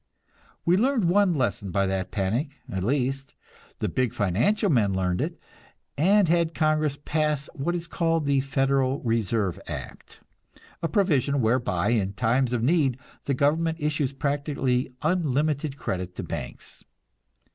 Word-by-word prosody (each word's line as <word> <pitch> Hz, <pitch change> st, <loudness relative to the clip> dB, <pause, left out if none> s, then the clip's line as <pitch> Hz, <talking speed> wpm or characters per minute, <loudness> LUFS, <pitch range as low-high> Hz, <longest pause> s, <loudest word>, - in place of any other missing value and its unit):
We 175 Hz, +2 st, +4 dB
learned 245 Hz, -1 st, +2 dB
one 185 Hz, 0 st, +3 dB
lesson 120 Hz, -7 st, -1 dB
by 100 Hz, +2 st, +1 dB
that 95 Hz, -1 st, -2 dB
panic; 115 Hz, -, -1 dB
at 95 Hz, -1 st, -3 dB
least, 135 Hz, +3 st, -1 dB, 0.4 s
the -, -, -1 dB
big 130 Hz, -3 st, -1 dB
financial 115 Hz, -, +1 dB
men 115 Hz, -, +2 dB
learned 90 Hz, -1 st, 0 dB
it, -, -, -3 dB, 0.6 s
and 195 Hz, +5 st, +4 dB
had 170 Hz, 0 st, +1 dB
Congress 155 Hz, -2 st, +1 dB
pass 150 Hz, -2 st, 0 dB
what 170 Hz, +3 st, -2 dB
is 170 Hz, -1 st, -4 dB
called 165 Hz, -2 st, 0 dB
the 140 Hz, -1 st, +3 dB
"Federal 135 Hz, 0 st, +1 dB
Reserve 115 Hz, -5 st, 0 dB
Act," 65 Hz, -, -8 dB, 0.6 s
a 165 Hz, -, 0 dB
provision 145 Hz, -6 st, +2 dB
whereby 110 Hz, -6 st, +1 dB
in 100 Hz, -5 st, +1 dB
time 125 Hz, +4 st, +2 dB
of 120 Hz, -2 st, 0 dB
need 140 Hz, -3 st, +2 dB, 0.3 s
the 140 Hz, -, 0 dB
government 160 Hz, +4 st, +1 dB
issues 150 Hz, -3 st, 0 dB
practically 140 Hz, -2 st, -1 dB
unlimited 150 Hz, -3 st, 0 dB
credit 90 Hz, -7 st, -4 dB
to -, -, -5 dB
banks. -, -, -7 dB
140 Hz, 140 wpm, -26 LUFS, 115-160 Hz, 0.6 s, We